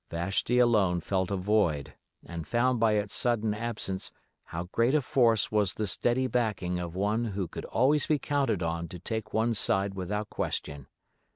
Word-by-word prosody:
Vashti 95 +8 0
alone 105 -8 +4
felt 95 +1 -1
a 100 - 0
void 90 -7 +1 0.3
and 85 -2 -7
found 125 +1 +2
by 110 -1 +4
its 105 -1 0
sudden 115 -3 +1
absence 105 -4 -3 0.3
how 85 +1 -5
great 115 +9 +1
a 155 - +4
force 115 -4 +3
was 105 -3 +1
the 110 - -1
steady 120 +6 0
backing 105 -8 -1
of 85 -1 -5
one 105 +5 0
who 100 -4 -3
could - - -7
always 140 +5 +2
be 155 - +3
counted 135 - 0
on 85 0 -2
to 90 - -8
take 110 +4 -4
one's 110 -1 +1
side 95 0 +1
without 100 +3 -3
question. 70 -1 -3
105 Hz, 175 wpm, -29 LUFS, 90-120 Hz, 0.3 s, alone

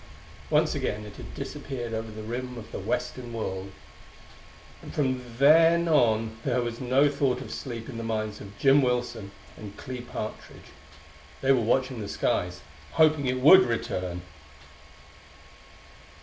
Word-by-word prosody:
Once - - +3
again 105 +1 -3
it 105 -1 -11
had - - -9
disappeared 120 - -5
over 110 0 -3
the 110 0 -8
rim 125 +2 -5
of 110 - -10
the - - -5
western 125 -2 -3
world 95 -4 -4 1.1
and - - -10
from 130 -3 0 0.2
then 165 +4 +6
on 115 -7 +2
there 125 -2 +1
was 120 +1 -5
no 130 +3 +4
thought 140 -3 0
of 135 - -7
sleep 115 -4 -6
in 125 - -7
the 115 - -4
minds 110 -1 -3
of 100 0 -11
Jim 135 +4 +5
Wilson 120 -5 -1 0.3
and 100 -2 -10
Clee 125 -1 -6
Partridge. 120 -3 -8 0.7
They 135 - +3
were 130 -3 +4
watching 130 +2 +1
the 100 - -5
skies, - - -1 0.3
hoping 155 -3 +4
it 130 0 -1
would 185 +8 +9
return. 90 - -2
120 Hz, 150 wpm, -27 LUFS, 110-135 Hz, 1.1 s, would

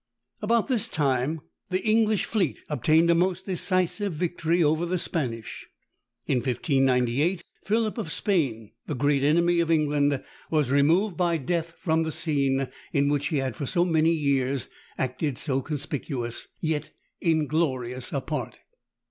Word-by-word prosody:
About 225 +1 +2
this 250 -6 +1
time 145 +1 0 0.3
the 185 +1 -1
English 215 -1 +3
fleet 210 -3 0
obtained 160 +2 +3
a - - +6
most 185 +2 +1
decisive 185 +1 0
victory 170 +1 0
over 155 +2 +2
the 175 +1 0
Spanish. 120 -10 -4 0.6
In - - +1
1598, 135 +5 +1 0.2
Philip 220 +2 0
of 220 - -4
Spain, 130 - -1 0.2
the 150 - -2
great 140 +1 +2
enemy 170 +4 +3
of 170 -1 +1
England, 145 -3 +2 0.3
was 150 -5 +1
removed 165 +7 +3
by 175 -2 +2
death 165 +3 -2
from 160 -1 +1
that 160 -1 -2
scene, 135 -3 +1 0.2
in 140 0 +2
which 145 0 0
he 155 - -1
had, 130 -4 -2
for 140 - -4
so 175 +5 +2
many 165 -2 +3
years, 140 -4 0 0.3
acted 130 +1 -2
so 135 -1 +1
conspicuous, 140 -4 -4
yet 155 -2 -2 0.3
inglorious 150 -6 0
a 140 - -1
part. 150 +3 -4
155 Hz, 145 wpm, -26 LUFS, 135-175 Hz, 0.6 s, a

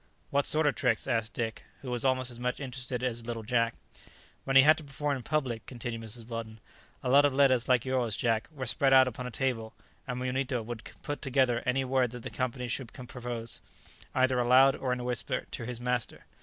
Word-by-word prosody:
"What 140 0 +2
sort 155 0 +3
of 145 - +4
tricks?" 125 -5 +1
asked 115 -3 -1
Dick, 115 -2 -3 0.2
who 130 - -5
was 120 -1 -1
almost 130 -1 +1
as 120 - -9
much 125 +1 -2
interested 125 -2 -4
as 120 -2 -2
little 115 -2 -4
Jack. 115 0 +1 0.7
"When 135 - -1
he 135 - +10
had 155 +2 +7
to 160 - -7
perform 140 0 -2
in - - -7
public," 130 -5 -2
continued 120 -2 -5
Mrs. 115 +1 -5
Weldon, 115 -2 -6 0.4
"a - - -1
lot 140 +2 +7
of 145 -2 +2
letters 130 -4 +4
like 125 -1 +4
yours, 125 -5 0
Jack, 115 -2 +1
were 135 -4 -5
spread 135 +2 +3
out 130 -1 +8
upon 125 0 -4
a - - -4
table, 115 -2 -2 0.3
and 125 -1 -3
Munito 130 -1 -1
would 120 -1 -7
put 145 - -4
together 130 -3 +2
any 130 +1 +1
word 130 -1 +2
that 125 -2 -8
the - - -6
company 125 0 -2
should 120 0 -4
propose, 120 -2 -7 0.5
either 130 -1 +3
aloud 130 +2 +6
or 130 - -2
in 125 - 0
a - - -4
whisper, 125 -4 -2
to 115 - -5
his 125 -2 -5
master. 125 -1 -2
125 Hz, 215 wpm, -30 LUFS, 120-130 Hz, 0.7 s, he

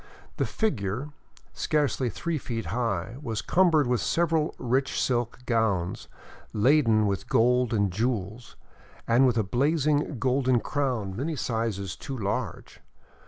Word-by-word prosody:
The - - 0
figure, 130 - -2 0.4
scarcely 145 -4 0
three 165 +7 -3
feet 115 -3 -4
high, 115 -2 -2
was 115 -6 -3
cumbered 170 -5 +3
with 125 -1 +1
several 165 -2 +1
rich 130 +2 0
silk 120 -2 0
gowns, 110 -7 0 0.5
laden 115 -2 +4
with 100 -2 -2
gold 125 +1 +3
and 100 -4 +1
jewels, 110 0 -3 0.5
and 125 +3 +5
with 120 -2 +1
a 110 - +3
blazing 145 - +1
golden 130 +1 +2
crown 125 -9 -2
many 150 +8 -2
sizes 110 - -2
too 135 -2 -6
large. 100 -3 -4
120 Hz, 125 wpm, -27 LUFS, 110-140 Hz, 0.5 s, and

